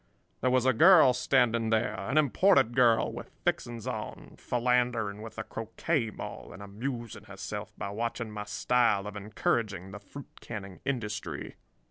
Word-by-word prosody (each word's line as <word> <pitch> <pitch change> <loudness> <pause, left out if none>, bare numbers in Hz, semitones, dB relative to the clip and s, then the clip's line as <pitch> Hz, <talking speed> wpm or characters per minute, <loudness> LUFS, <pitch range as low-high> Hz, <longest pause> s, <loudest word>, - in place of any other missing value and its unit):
"There 130 - +2
was 130 0 +2
a 130 - +4
girl 160 0 +7
standing 120 -3 +2
there—an 115 +2 0
imported 140 - +4
girl 120 -3 +4
with - - -8 0.2
fixings 120 -2 -1
on— - - -6
philandering 120 -4 0
with 110 0 -9
a - - -3
croquet 115 +3 -2
maul - - -8
and 100 - -10
amusing 115 +3 -6
herself - - -6
by 100 - -4
watching 115 +1 -3
my 105 -1 -5
style 115 -4 +2
of 105 0 -6
encouraging 100 -1 -2
the 100 - -8
fruit 140 +7 -12
canning 100 -5 -7
industry. 110 -6 -4
115 Hz, 145 wpm, -29 LUFS, 105-125 Hz, 0.2 s, girl